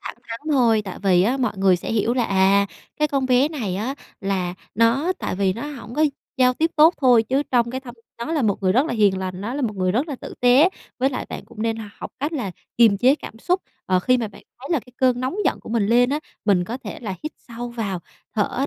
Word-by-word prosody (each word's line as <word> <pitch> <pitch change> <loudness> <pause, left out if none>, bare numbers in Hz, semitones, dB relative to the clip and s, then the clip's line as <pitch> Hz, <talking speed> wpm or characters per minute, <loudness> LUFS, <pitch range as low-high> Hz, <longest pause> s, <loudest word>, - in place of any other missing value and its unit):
thẳng - - -7
thắn 230 0 -5
thôi, 230 -6 +4
tại 190 - -7
vì 185 -3 +4
á 245 +7 +2
mọi 255 -2 0
người 190 -2 +4
sẽ 175 - -5
hiểu 225 +2 +1
là 245 -2 +1
"À, 195 +1 +3 0.3
cái 300 0 +1
con 275 -2 0
bé 255 +3 +4
này 225 - -3
á, 240 +7 -2 0.3
là 185 -3 -1 0.2
nó 235 - +3
tại - - -3
vì 195 -1 +2
nó 230 - -6
hổng 260 -5 -8
có 310 - +3 0.3
giao 255 -1 +4
tiếp 325 +4 +1
tốt 315 +3 +7
thôi 245 -4 +6
chứ 265 +5 0
trong 235 -2 +2
cái 260 +1 -4
thâm 245 -2 -10 0.2
nó 270 +8 -3
là 300 -5 +1
một 205 -2 0
người 185 0 +3
rất 265 +7 +3
là - - -2
hiền 200 -3 +3
lành, 185 -1 -4
nó 230 +6 -4
là 285 - -2
một 215 -4 -2
người 185 -1 +1
rất 270 +8 0
là 275 - -4
tử - - -8
tế." 250 +8 +6 0.3
Với 265 +2 +2
lại 250 - -4
bạn - - -7
cũng 215 - -8
nên 225 0 0 0.2
học - - -6
cách 295 +4 -1
là 245 -11 -2 0.3
kiềm 225 -4 +6
chế 255 +4 +5
cảm 225 - -10
xúc, 365 +9 0 0.3
ờ, 185 -1 +3
khi 255 +7 +3
mà 230 -3 -2
bạn 200 - -15 0.2
thấy 275 - -8
là 305 - +2
cái 250 - -17
cơn 255 -1 +2
nóng 260 +9 -2
giận - - +1
của - - -12
mình 220 -3 +1
lên 245 +3 +4
á, 295 +2 0 0.2
mình 190 -4 +3
có 235 +7 -5
thể - - -6
là 205 -5 -4
hít 305 - -4 0.2
sâu 240 +1 -6
vào, 205 -6 -3 0.3
thở 245 +6 0
235 Hz, 265 wpm, -22 LUFS, 200-265 Hz, 0.3 s, tốt